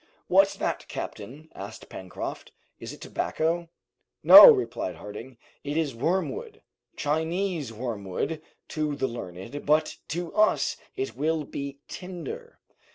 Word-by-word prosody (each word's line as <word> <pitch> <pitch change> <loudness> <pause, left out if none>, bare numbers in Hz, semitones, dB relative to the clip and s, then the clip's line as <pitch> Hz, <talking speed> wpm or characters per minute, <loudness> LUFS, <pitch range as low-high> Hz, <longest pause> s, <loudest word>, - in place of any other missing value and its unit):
"What's - - +4
that, - - -3
captain?" 155 +5 -7
asked 100 +3 -9
Pencroft. 95 -1 -7 0.3
"Is - - -7
it - - -12
tobacco?" 165 +1 -1 0.5
"No," - - +12
replied 385 - -1
Harding, 115 +5 -9 0.3
"it 145 +2 -3
is 155 -5 0
wormwood; 190 - -2 0.3
Chinese 160 - -1
wormwood 115 - -4 0.3
to 150 -2 -2
the 135 -1 -1
learned, 115 +3 -7
but 155 +1 +2
to 170 +1 -4
us 215 +1 +3 0.2
it 395 +1 -3
will 155 +1 0
be 140 -1 -6
tinder." 190 - -8
155 Hz, 120 wpm, -27 LUFS, 125-175 Hz, 0.5 s, No